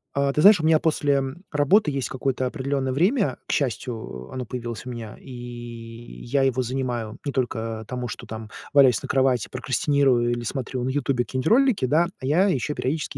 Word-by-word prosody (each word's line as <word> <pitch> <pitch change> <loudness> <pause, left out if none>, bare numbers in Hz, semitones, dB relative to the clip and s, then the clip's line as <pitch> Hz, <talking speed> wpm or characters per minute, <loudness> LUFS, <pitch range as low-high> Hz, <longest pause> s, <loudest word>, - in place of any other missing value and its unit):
Э, 140 0 +2
ты 150 - +1
знаешь, 200 +1 +8
у 155 - -1
меня 160 -1 +5
после 145 -3 +2 0.3
работы 150 +4 +3
есть 135 -2 -2
какое-то 130 0 -1
определенное 135 0 -2
время. 195 - +2
К - - -2
счастью, 110 - -3
оно 130 -1 -4
появилось 120 -1 -6
у 125 - -6
меня, 115 -3 -7
и 135 - -12 0.9
я 135 +3 +1
его 130 -1 +2
занимаю 120 -3 -3
не 140 - -1
только 115 -4 -2
тому, 125 -1 -4
что - - -8 0.5
валяюсь 135 -5 +6
на - - -6
кровати, 130 -4 +2
прокрастинирую 130 -1 +2
или 120 0 -2
смотрю 130 0 -3
на 130 - -1
"Ютубе" 135 -2 0
какие-нибудь 130 +5 -3
ролики, 245 - +4
да, 160 +7 +3
а - - -5
я 165 +9 +3
еще 150 -4 0
периодически 150 +3 -3
130 Hz, 180 wpm, -24 LUFS, 125-145 Hz, 0.9 s, знаешь